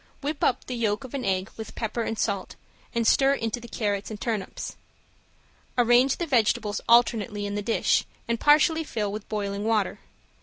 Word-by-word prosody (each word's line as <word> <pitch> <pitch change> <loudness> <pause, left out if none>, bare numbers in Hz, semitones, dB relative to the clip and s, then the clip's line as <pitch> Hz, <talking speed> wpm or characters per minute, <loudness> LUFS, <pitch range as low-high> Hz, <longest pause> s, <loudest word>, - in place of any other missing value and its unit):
Whip 290 +1 -3
up 255 - +1
the 255 - -5
yolk 225 -1 0
of 260 - -10
an 275 -2 -3
egg 190 0 -1
with 220 - -8
pepper 230 +1 -2
and 225 -1 -2
salt, 200 -4 -2 0.4
and 230 -1 +1
stir 270 +4 +4
into 225 -2 -2
the 235 - -10
carrots 205 -3 -2
and 215 -2 -7
turnips. 220 -5 -4 1.0
Arrange 245 +2 +4
the 345 - -2
vegetables 220 -6 +1
alternately 225 -3 +3
in 205 - -3
the 205 - -2
dish 225 +2 +2 0.2
and 235 -1 -1
partially 310 +2 +4
fill 215 -8 -2
with 210 0 -7
boiling 200 -1 -2
water. 215 -2 0
225 Hz, 180 wpm, -26 LUFS, 205-245 Hz, 1.0 s, stir